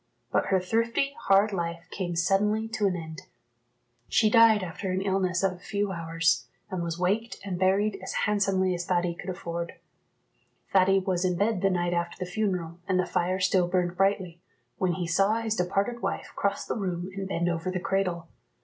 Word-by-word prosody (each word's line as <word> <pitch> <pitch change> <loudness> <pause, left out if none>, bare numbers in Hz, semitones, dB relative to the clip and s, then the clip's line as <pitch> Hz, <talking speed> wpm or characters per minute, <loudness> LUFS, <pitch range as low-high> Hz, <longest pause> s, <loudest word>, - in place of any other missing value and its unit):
But - - +1
her 190 - +3
thrifty, 230 +8 0
hard 200 +2 +5
life 170 -1 -3
came 175 -3 -3
suddenly 210 +5 +2
to 220 -3 +1
an 185 - 0
end. 160 -2 -8 0.8
She 215 -1 +3
died 225 -3 +6
after 185 +2 -5
an 190 +1 -1
illness 190 -2 0
of 195 - +3
a 180 - -13
few 200 +1 -2
hours, 165 -1 0 0.2
and 185 -2 -2
was 170 -1 -3
waked 205 +6 0
and 180 -3 -3
buried 195 +2 +2
as 190 - -5
handsomely 195 -3 +2
as 175 0 -3
Thady 175 -1 +1
could 180 +2 -8
afford. 170 -2 -4 1.0
Thady 195 0 +5
was 185 -2 0
in 180 -1 +1
bed 205 0 +1
the 195 - +3
night 175 -1 0
after 170 0 -2
the 180 -1 -5
funeral, 180 -5 -2
and 185 -2 +2
the 185 - +2
fire 180 +2 0
still 185 -1 +3
burned 175 -1 0
brightly, 190 -3 0 0.4
when 185 -2 +1
he 175 0 -3
saw 195 +5 +2
his 225 -1 -1
departed 200 +6 -1
wife - - -3
cross 200 0 -1
the - - -2
room 185 -3 -3
and 195 -1 -4
bend 175 -2 -1
over 170 +1 -1
the 185 0 -2
cradle. 180 -3 -1
185 Hz, 190 wpm, -27 LUFS, 175-200 Hz, 1.0 s, died